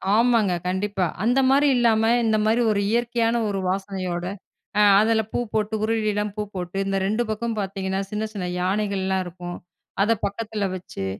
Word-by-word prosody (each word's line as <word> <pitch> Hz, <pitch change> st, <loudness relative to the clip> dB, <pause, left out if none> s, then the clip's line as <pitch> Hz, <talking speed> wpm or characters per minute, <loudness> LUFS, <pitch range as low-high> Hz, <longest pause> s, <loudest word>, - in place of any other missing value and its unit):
ஆமாங்க, 230 Hz, -5 st, +3 dB
கண்டிப்பா. 190 Hz, 0 st, 0 dB, 0.2 s
அந்த 245 Hz, +4 st, +3 dB
மாரி 285 Hz, +2 st, +4 dB
இல்லாம, 225 Hz, -2 st, +3 dB, 0.2 s
இந்த 220 Hz, -1 st, +2 dB
மாதிரி 225 Hz, +3 st, +3 dB
ஒரு 200 Hz, -1 st, +1 dB
இயற்கையான 235 Hz, 0 st, +1 dB
ஒரு 195 Hz, -1 st, -2 dB
வாசனையோட, 185 Hz, -2 st, -3 dB, 0.6 s
அ -, -, +6 dB, 0.2 s
அதில 220 Hz, +1 st, +3 dB
பூ -, -, -1 dB
போட்டு 215 Hz, 0 st, 0 dB
உருளிலாம் 210 Hz, -2 st, 0 dB
பூ 210 Hz, -, -2 dB
போட்டு, 180 Hz, +1 st, -4 dB
இந்த 195 Hz, 0 st, 0 dB
2 215 Hz, +4 st, 0 dB
பக்கமும் 220 Hz, +1 st, -2 dB
பாத்தீங்கன்னா, 190 Hz, 0 st, -3 dB
சின்ன 215 Hz, +1 st, -2 dB
சின்ன 185 Hz, -3 st, -3 dB
யானைகள்லாம் 190 Hz, 0 st, 0 dB
இருக்கும். 175 Hz, 0 st, -7 dB, 0.4 s
அத 215 Hz, +3 st, +3 dB
பக்கத்தில 210 Hz, 0 st, -2 dB
வச்சு, 135 Hz, -, -6 dB
210 Hz, 155 wpm, -23 LUFS, 190-225 Hz, 0.6 s, அ